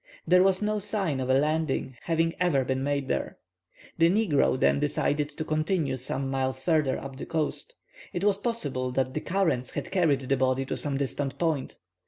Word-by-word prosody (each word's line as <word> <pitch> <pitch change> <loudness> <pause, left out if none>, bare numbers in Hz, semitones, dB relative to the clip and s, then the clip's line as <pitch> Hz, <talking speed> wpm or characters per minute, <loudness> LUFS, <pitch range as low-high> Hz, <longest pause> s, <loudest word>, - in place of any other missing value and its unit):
There 180 0 +5
was 190 +1 +3
no 210 0 0
sign 195 -8 -1
of 130 0 -2
a 130 - +5
landing 150 -3 0
having 165 0 +1
ever 155 -8 +2
been 130 0 -1
made 140 -1 -1
there. - - -2 0.6
The 165 0 +6
negro 175 -10 +2
then - - +3
decided 145 0 0
to 155 +1 -6
continue 155 -2 0
some 130 +1 -3
miles 130 -1 -1
further 155 -6 +2
up 135 -1 -8
the - - -6
coast. 165 - -3 0.4
It 175 - -3
was 205 -1 +3
possible 145 - -2
that 130 0 0
the 155 - -2
currents 165 -10 0
had 175 - -4
carried 165 -8 +2
the 135 +1 0
body 130 0 +1
to - - -3
some 140 -2 -2
distant 140 0 -2
point. 160 -6 -1
150 Hz, 190 wpm, -27 LUFS, 135-175 Hz, 0.6 s, The